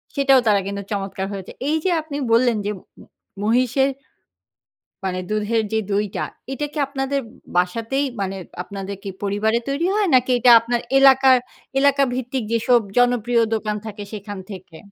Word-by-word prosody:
সেটাও 275 Hz, -2 st, +5 dB
তারা 205 Hz, -2 st, +4 dB
কিন্তু 200 Hz, 0 st, -4 dB
চমৎকার 195 Hz, -1 st, -3 dB
হয়েছে। 195 Hz, -2 st, -7 dB, 0.2 s
এই 310 Hz, -, +2 dB
যে 375 Hz, -, +1 dB
আপনি 300 Hz, -2 st, -6 dB
বললেন, 235 Hz, -1 st, +4 dB
যে 210 Hz, -, 0 dB
ম-ম -, -, -19 dB, 0.4 s
মহিষের 255 Hz, +4 st, +2 dB, 1.2 s
মানে 185 Hz, -1 st, -2 dB
দুধের 215 Hz, +1 st, 0 dB
যে 220 Hz, -, +2 dB
দইটা, 205 Hz, 0 st, -1 dB, 0.3 s
এটা 295 Hz, +2 st, -2 dB
কি 305 Hz, -, -6 dB
আপনাদের 275 Hz, 0 st, -2 dB, 0.4 s
বাসাতেই 230 Hz, +10 st, 0 dB, 0.2 s
মানে, 195 Hz, 0 st, -2 dB, 0.3 s
আপনাদের 195 Hz, +1 st, -7 dB
কি 200 Hz, -, -5 dB
পরিবারে 205 Hz, +3 st, +1 dB
তৈরি 280 Hz, +5 st, 0 dB
হয়? 420 Hz, -1 st, +2 dB
নাকি 255 Hz, 0 st, +3 dB
এটা 245 Hz, +1 st, +5 dB
আপনার 235 Hz, +1 st, -1 dB, 0.2 s
এলাকা, 270 Hz, -1 st, +6 dB, 0.5 s
এলাকা 280 Hz, 0 st, +4 dB
ভিত্তিক 255 Hz, -1 st, -3 dB
যেসব 235 Hz, +1 st, +3 dB, 0.2 s
জনপ্রিয় 245 Hz, -1 st, +3 dB
দোকান 215 Hz, -1 st, -2 dB
থাকে 210 Hz, -1 st, -7 dB
সেখান 205 Hz, -1 st, -7 dB
থেকে? 185 Hz, -4 st, -10 dB
230 Hz, 155 wpm, -21 LUFS, 205-265 Hz, 1.2 s, এলাকা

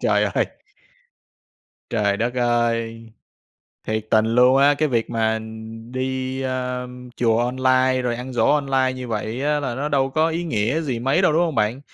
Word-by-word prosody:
Trời -, -, +2 dB
ơi! -, -, +2 dB, 1.4 s
Trời 105 Hz, -3 st, +1 dB
đất 120 Hz, +2 st, -1 dB
ơi, 115 Hz, -2 st, 0 dB, 0.8 s
thiệt 110 Hz, 0 st, -2 dB
tình 110 Hz, 0 st, +4 dB
luôn 125 Hz, +3 st, +4 dB
á! 140 Hz, +1 st, +5 dB
Cái 155 Hz, +1 st, 0 dB
việc 115 Hz, -3 st, -1 dB
mà 110 Hz, -1 st, 0 dB, 0.5 s
đi, 130 Hz, 0 st, -3 dB
a, 125 Hz, -1 st, -3 dB, 0.3 s
chùa 115 Hz, -2 st, +2 dB
online, 130 Hz, +1 st, +2 dB
rồi 120 Hz, -1 st, -1 dB
ăn 125 Hz, +1 st, -7 dB
giỗ 120 Hz, -, +2 dB
online 135 Hz, -3 st, +2 dB
như 130 Hz, -1 st, -7 dB
vậy 110 Hz, +3 st, -3 dB
á 150 Hz, 0 st, +1 dB
là 130 Hz, -4 st, -3 dB
nó 145 Hz, +4 st, -2 dB
đâu 135 Hz, -2 st, +1 dB
có 155 Hz, +3 st, +2 dB
ý 170 Hz, +2 st, -2 dB
nghĩa 120 Hz, +2 st, 0 dB
gì 130 Hz, -7 st, -2 dB
mấy 135 Hz, +9 st, +1 dB
đâu, 155 Hz, -, +4 dB
đúng 165 Hz, +3 st, +3 dB
hông 165 Hz, -4 st, -1 dB
bạn? 110 Hz, +6 st, 0 dB
130 Hz, 175 wpm, -22 LUFS, 115-135 Hz, 1.4 s, á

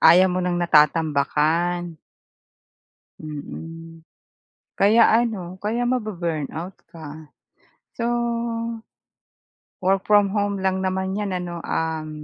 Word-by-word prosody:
Ayaw 180 Hz, +3 st, +7 dB
mo 180 Hz, -, -1 dB
ng 180 Hz, 0 st, 0 dB
natatambakan. 160 Hz, +1 st, +2 dB, 1.2 s
Mm. 165 Hz, +2 st, -8 dB, 0.7 s
Kaya 220 Hz, +4 st, +5 dB, 0.2 s
ano, 190 Hz, -7 st, -4 dB
kaya 235 Hz, +4 st, 0 dB
mabu-burn 180 Hz, -, -2 dB
out 175 Hz, +4 st, -6 dB, 0.2 s
ka. 155 Hz, -2 st, -10 dB, 0.7 s
So, 230 Hz, -, 0 dB, 1.7 s
work 190 Hz, +1 st, +1 dB
from 205 Hz, -1 st, +4 dB
home 200 Hz, -1 st, 0 dB
lang 190 Hz, 0 st, 0 dB
naman 190 Hz, +1 st, -1 dB
'yan 205 Hz, -2 st, -2 dB
ano? 175 Hz, -2 st, -4 dB
Um. 160 Hz, -1 st, -2 dB
175 Hz, 100 wpm, -23 LUFS, 160-195 Hz, 1.7 s, Ayaw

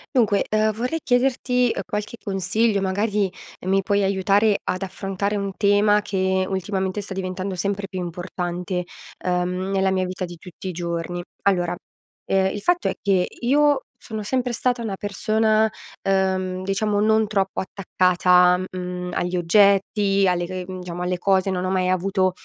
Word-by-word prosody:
Dunque, 210 Hz, -5 st, +3 dB
uhm, 215 Hz, 0 st, +2 dB
vorrei 250 Hz, +9 st, -2 dB
chiederti, 250 Hz, -1 st, +2 dB
uhm, -, -, -2 dB
qualche 210 Hz, +2 st, -4 dB
consiglio. 200 Hz, +2 st, +1 dB
Magari 200 Hz, +1 st, 0 dB, 0.4 s
mi 195 Hz, +1 st, +3 dB
puoi 200 Hz, +1 st, +1 dB
aiutare 200 Hz, +2 st, +3 dB
ad 185 Hz, -, -2 dB
affrontare 195 Hz, +1 st, -3 dB
un 200 Hz, -1 st, -2 dB
tema 205 Hz, 0 st, +4 dB
che 190 Hz, -1 st, 0 dB
ultimamente 190 Hz, +1 st, -2 dB
sta 200 Hz, -1 st, -7 dB
diventando 185 Hz, 0 st, -3 dB
sempre 200 Hz, +2 st, -2 dB
più 185 Hz, -, -5 dB
importante, 180 Hz, +1 st, -4 dB, 0.4 s
uhm, 180 Hz, +1 st, -1 dB
nella 190 Hz, 0 st, +2 dB
mia 185 Hz, -1 st, +1 dB
vita 185 Hz, +1 st, -5 dB
di 175 Hz, -1 st, -6 dB
tutti 180 Hz, +3 st, -8 dB
i -, -, -2 dB
giorni. 170 Hz, 0 st, -3 dB, 0.2 s
Allora, 175 Hz, -3 st, +1 dB, 0.5 s
ehm, 195 Hz, 0 st, +2 dB
il 205 Hz, -, -5 dB
fatto 355 Hz, -, +1 dB
è -, -, 0 dB
che 190 Hz, -3 st, +2 dB
io 285 Hz, +2 st, +3 dB, 0.2 s
sono 220 Hz, -1 st, -6 dB
sempre 250 Hz, +3 st, -1 dB
stata 245 Hz, +1 st, 0 dB
una 215 Hz, -4 st, -3 dB
persona, 215 Hz, +2 st, +1 dB, 0.3 s
uhm, 190 Hz, -1 st, 0 dB
diciamo, 205 Hz, +2 st, 0 dB
non 220 Hz, 0 st, +3 dB
troppo 195 Hz, -2 st, -1 dB
attaccata, 180 Hz, -1 st, +3 dB
mhmm, 180 Hz, -1 st, -5 dB
agli 180 Hz, +1 st, -1 dB
oggetti, 195 Hz, +2 st, +3 dB
alle 175 Hz, -1 st, 0 dB
c 185 Hz, 0 st, -4 dB
mhmm, 185 Hz, 0 st, -7 dB
diciamo, 175 Hz, 0 st, -6 dB
alle 180 Hz, 0 st, -1 dB
cose. 190 Hz, +1 st, +2 dB
Non 185 Hz, 0 st, -1 dB
ho -, -, -1 dB
mai 185 Hz, -1 st, +1 dB
avuto 185 Hz, +1 st, +1 dB
195 Hz, 160 wpm, -23 LUFS, 185-210 Hz, 0.5 s, tema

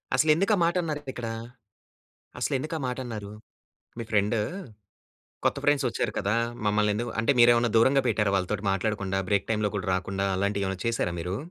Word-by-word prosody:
అసలెందుకు 160 Hz, +7 st, +3 dB
ఆ -, -, -2 dB
మాట 170 Hz, +1 st, +2 dB
అన్నారిక్కడ? 145 Hz, -7 st, -4 dB, 1.1 s
అసలెందుకు 150 Hz, +4 st, -1 dB
ఆ -, -, -7 dB
మాటన్నారు? 120 Hz, -5 st, -5 dB, 0.7 s
మీ 115 Hz, -, -3 dB
ఫ్రెండూ, 105 Hz, +1 st, +2 dB, 1.1 s
"కొత్త -, -, +2 dB
ఫ్రెండ్సొచ్చారు 140 Hz, -5 st, +1 dB
కదా! 100 Hz, +2 st, 0 dB, 0.3 s
మమ్మల్నెందుకు" 105 Hz, +3 st, +1 dB
అంటే 115 Hz, +5 st, +3 dB
మీరేమైనా 120 Hz, 0 st, +5 dB
దూరంగా 135 Hz, +4 st, +5 dB
పెట్టారా 105 Hz, -3 st, +1 dB
వాళ్ళతోటి 100 Hz, +3 st, -2 dB
మాట్లాడకుండా? 100 Hz, -1 st, -1 dB
బ్రేక్ 100 Hz, 0 st, +1 dB
టైమ్‌లో 105 Hz, -2 st, +1 dB
కూడా 95 Hz, -2 st, -3 dB
రాకుండా 95 Hz, +1 st, -2 dB
అలాంటియేమైనా 100 Hz, -1 st, -1 dB
చేశారా 115 Hz, -7 st, 0 dB
మీరు? 90 Hz, +3 st, -3 dB
110 Hz, 135 wpm, -27 LUFS, 100-130 Hz, 1.1 s, మీరేమైనా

